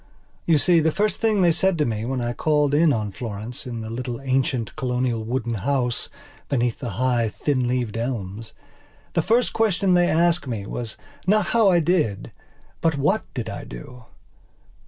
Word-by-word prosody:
You 165 Hz, -2 st, +5 dB
see, 170 Hz, +3 st, +4 dB
the 160 Hz, 0 st, +2 dB
first 210 Hz, +5 st, 0 dB
thing 215 Hz, -4 st, +3 dB
they 170 Hz, -, +5 dB
said 190 Hz, +2 st, +1 dB
to 150 Hz, -, +2 dB
me 110 Hz, -1 st, -2 dB
when 130 Hz, 0 st, -2 dB
I 120 Hz, 0 st, -1 dB
called 150 Hz, 0 st, +1 dB
in 155 Hz, +1 st, +5 dB
on 105 Hz, -5 st, -1 dB
Florence 110 Hz, +4 st, -6 dB
in 120 Hz, -2 st, -5 dB
the 110 Hz, -, -6 dB
little 120 Hz, 0 st, -4 dB
ancient, 130 Hz, -4 st, -1 dB
colonial, 125 Hz, -4 st, -1 dB
wooden 120 Hz, +1 st, -2 dB
house 125 Hz, +2 st, -1 dB, 0.4 s
beneath 120 Hz, -4 st, 0 dB
the 125 Hz, -, -4 dB
high, 120 Hz, -3 st, +2 dB
thin 125 Hz, +5 st, -1 dB
leaved 120 Hz, -3 st, -1 dB
elmsthe 115 Hz, -3 st, -4 dB, 0.7 s
first 235 Hz, +8 st, +2 dB
question 200 Hz, -4 st, +2 dB
they 175 Hz, 0 st, +4 dB
asked 170 Hz, -1 st, +2 dB
me 110 Hz, -5 st, -3 dB
was 115 Hz, +1 st, -5 dB, 0.3 s
not 210 Hz, 0 st, +4 dB
how 225 Hz, -4 st, +5 dB
I 175 Hz, -2 st, +4 dB
did 155 Hz, -, 0 dB, 0.5 s
but 160 Hz, -3 st, +2 dB
what 190 Hz, +11 st, 0 dB
did 120 Hz, -4 st, -3 dB
I -, -, -5 dB
do. 115 Hz, -, -10 dB
130 Hz, 175 wpm, -23 LUFS, 115-165 Hz, 0.7 s, You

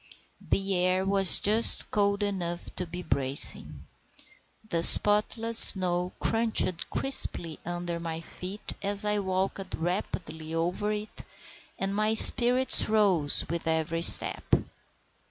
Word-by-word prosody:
The 195 Hz, 0 st, -3 dB
air 185 Hz, +1 st, -3 dB
was 195 Hz, -1 st, +4 dB
just 215 Hz, +3 st, +3 dB
cold 200 Hz, 0 st, -3 dB
enough 175 Hz, -4 st, -7 dB
to 180 Hz, -, -5 dB
be 175 Hz, +2 st, -11 dB
bracing. 135 Hz, -2 st, -1 dB, 0.8 s
The 170 Hz, -5 st, -5 dB
spotless 220 Hz, +5 st, +4 dB
snow 180 Hz, -1 st, +5 dB
crunched 225 Hz, -6 st, -3 dB
crisply 175 Hz, -, -1 dB
under 175 Hz, -1 st, -8 dB
my 165 Hz, -1 st, -9 dB
feet 185 Hz, +4 st, -10 dB
as 200 Hz, +1 st, -6 dB
I 210 Hz, 0 st, -4 dB
walked 190 Hz, 0 st, -7 dB
rapidly 165 Hz, -2 st, -8 dB
over 180 Hz, +6 st, -5 dB
it, 210 Hz, 0 st, -7 dB, 0.6 s
and 195 Hz, 0 st, -6 dB
my 215 Hz, +2 st, -3 dB
spirits 250 Hz, +2 st, +5 dB
rose 195 Hz, -9 st, -1 dB
with 170 Hz, 0 st, -8 dB
every 160 Hz, +1 st, -5 dB
step. -, -, +4 dB
190 Hz, 120 wpm, -23 LUFS, 170-210 Hz, 0.8 s, snow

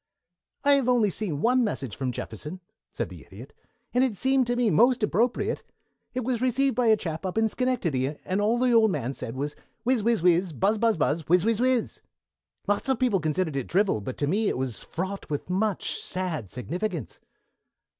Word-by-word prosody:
"I've 280 Hz, -3 st, +4 dB
only 230 Hz, -5 st, +3 dB
seen 170 Hz, -8 st, -3 dB
one 250 Hz, +1 st, +4 dB
message 135 Hz, -, -3 dB
from 130 Hz, -2 st, -2 dB
Jefferson," 150 Hz, -, -6 dB, 0.3 s
said -, -, -3 dB
the -, -, -11 dB
Idiot, -, -, -12 dB, 0.4 s
"and 250 Hz, +1 st, +4 dB
it 240 Hz, -6 st, 0 dB
seemed 265 Hz, +2 st, +2 dB
to 245 Hz, -, +1 dB
me 240 Hz, -3 st, +2 dB
most 240 Hz, +7 st, +4 dB
appropriate. 225 Hz, +5 st, +1 dB, 0.5 s
It 255 Hz, -, -1 dB
was 245 Hz, -1 st, -1 dB
received 260 Hz, +2 st, +2 dB
by 245 Hz, -2 st, +2 dB
a 220 Hz, -1 st, +6 dB
chap 165 Hz, -3 st, -5 dB
up 185 Hz, +2 st, -3 dB
in 220 Hz, 0 st, +4 dB
Schenectady, 165 Hz, -, -1 dB
and 190 Hz, +2 st, 0 dB
all 220 Hz, +3 st, +2 dB
the 250 Hz, 0 st, +2 dB
old 225 Hz, -2 st, +5 dB
man 135 Hz, -, -2 dB
said 115 Hz, -, -6 dB
was 145 Hz, +2 st, -3 dB, 0.3 s
'Whizz 250 Hz, -1 st, +2 dB
whizz 230 Hz, -4 st, +2 dB
whizz, 175 Hz, 0 st, +3 dB
buzz 205 Hz, +8 st, +1 dB
buzz 225 Hz, -3 st, +2 dB
buzz, 155 Hz, +1 st, +1 dB
whizz 180 Hz, 0 st, +5 dB
whizz 225 Hz, -1 st, +2 dB
whizz!' 255 Hz, -1 st, +1 dB, 0.7 s
Lots 205 Hz, +6 st, 0 dB
of 265 Hz, -, +3 dB
people 230 Hz, -6 st, +2 dB
considered 155 Hz, 0 st, -1 dB
it 135 Hz, -3 st, -2 dB
drivel, 190 Hz, -, +2 dB
but 130 Hz, +5 st, -6 dB
to 145 Hz, -, 0 dB
me 205 Hz, +8 st, +1 dB
it -, -, 0 dB
was 130 Hz, -4 st, -3 dB
fraught 190 Hz, +3 st, -5 dB
with 150 Hz, +4 st, -3 dB
much 200 Hz, +1 st, 0 dB
sad 170 Hz, -, -3 dB
significance." 175 Hz, -, -4 dB
205 Hz, 195 wpm, -26 LUFS, 155-240 Hz, 0.7 s, a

